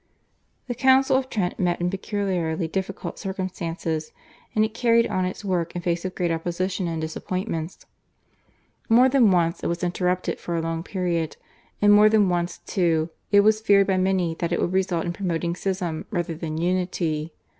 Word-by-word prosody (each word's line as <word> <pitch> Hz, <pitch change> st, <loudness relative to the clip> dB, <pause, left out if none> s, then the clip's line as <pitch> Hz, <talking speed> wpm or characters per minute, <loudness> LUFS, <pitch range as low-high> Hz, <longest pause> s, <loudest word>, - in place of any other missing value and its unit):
The 245 Hz, -, -3 dB
Council 265 Hz, +2 st, +4 dB
of 260 Hz, 0 st, 0 dB
Trent 190 Hz, -7 st, -2 dB
met 175 Hz, -1 st, +1 dB
in 175 Hz, +1 st, 0 dB
peculiarly 190 Hz, -5 st, -2 dB
difficult 190 Hz, +3 st, -4 dB
circumstances, 175 Hz, -5 st, -4 dB, 0.4 s
and 215 Hz, 0 st, +4 dB
it 215 Hz, -, -5 dB
carried 230 Hz, 0 st, +3 dB
on 185 Hz, 0 st, -1 dB
its 185 Hz, +3 st, -5 dB
work 175 Hz, -3 st, -1 dB
in 175 Hz, -, -4 dB
face 170 Hz, -1 st, -1 dB
of 185 Hz, -1 st, -4 dB
great 175 Hz, -2 st, 0 dB
opposition 175 Hz, +3 st, -2 dB
and 165 Hz, -1 st, -3 dB
disappointments. 165 Hz, +1 st, -4 dB, 1.0 s
More 240 Hz, +3 st, +6 dB
than 260 Hz, -5 st, +4 dB
once 170 Hz, -2 st, +1 dB
it -, -, 0 dB
was 170 Hz, +1 st, -2 dB
interrupted 180 Hz, +1 st, -1 dB
for 170 Hz, -, -4 dB
a 165 Hz, -, 0 dB
long 165 Hz, 0 st, -2 dB
period, 170 Hz, -3 st, -2 dB, 0.5 s
and 205 Hz, 0 st, +7 dB
more 210 Hz, +1 st, +7 dB
than 210 Hz, -3 st, +4 dB
once, 175 Hz, 0 st, -1 dB
too, 165 Hz, -3 st, +1 dB, 0.2 s
it 205 Hz, -1 st, +7 dB
was 215 Hz, +1 st, +3 dB
feared 200 Hz, -2 st, +5 dB
by 190 Hz, -1 st, +1 dB
many 185 Hz, -3 st, +1 dB
that 170 Hz, 0 st, -1 dB
it 175 Hz, -, +1 dB
would 175 Hz, -, 0 dB
result 185 Hz, -3 st, 0 dB
in 175 Hz, -, -2 dB
promoting 170 Hz, -2 st, -2 dB
schism 180 Hz, -4 st, -3 dB
rather 175 Hz, -4 st, -2 dB
than 155 Hz, -1 st, -5 dB
unity. 170 Hz, -3 st, -1 dB
180 Hz, 175 wpm, -24 LUFS, 170-200 Hz, 1.0 s, and